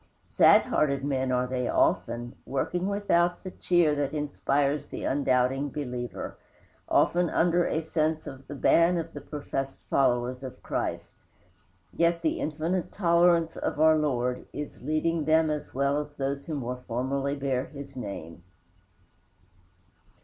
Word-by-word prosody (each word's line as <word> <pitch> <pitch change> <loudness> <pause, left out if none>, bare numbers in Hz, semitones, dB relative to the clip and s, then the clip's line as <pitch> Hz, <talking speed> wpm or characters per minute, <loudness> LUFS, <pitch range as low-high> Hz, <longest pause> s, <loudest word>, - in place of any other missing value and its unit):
Sad - - +6
hearted 140 -2 0
men 130 -2 0
are 125 0 +1
they 125 -1 -2
often, 120 +1 0
working 175 +7 -2
without 190 -4 +1
the 185 - -6
cheer 175 -5 +2
that 145 0 -1
inspires 145 -1 0
the - - -7
undoubting 135 0 +1
believer, 125 -5 -5 0.5
often 175 -1 +3
under 175 +1 +2
a 160 - -1
sense 155 0 -1
of 135 0 -9
the 145 - -7
ban 170 +5 +4
of 165 0 -4
the - - -7
professed 135 -2 -5
followers 125 -1 +1
of 130 - -9
Christ; - - -4 0.7
yet 170 0 +1
the 160 - 0
infinite 160 +4 -2
tolerance 170 -2 +3
of - - -3
our 160 0 +6
Lord 125 -5 -1
is 145 +1 -7
leading 155 +2 0
them 160 0 +3
as 150 -1 -4
well 140 +2 +1
as 150 0 -7
those 140 0 -3
who 160 - -3
more 125 -2 -4
formally 135 +4 -1
bear 135 -2 -1
his 140 -2 -10
name. 100 -9 -7
145 Hz, 140 wpm, -27 LUFS, 130-160 Hz, 0.7 s, Sad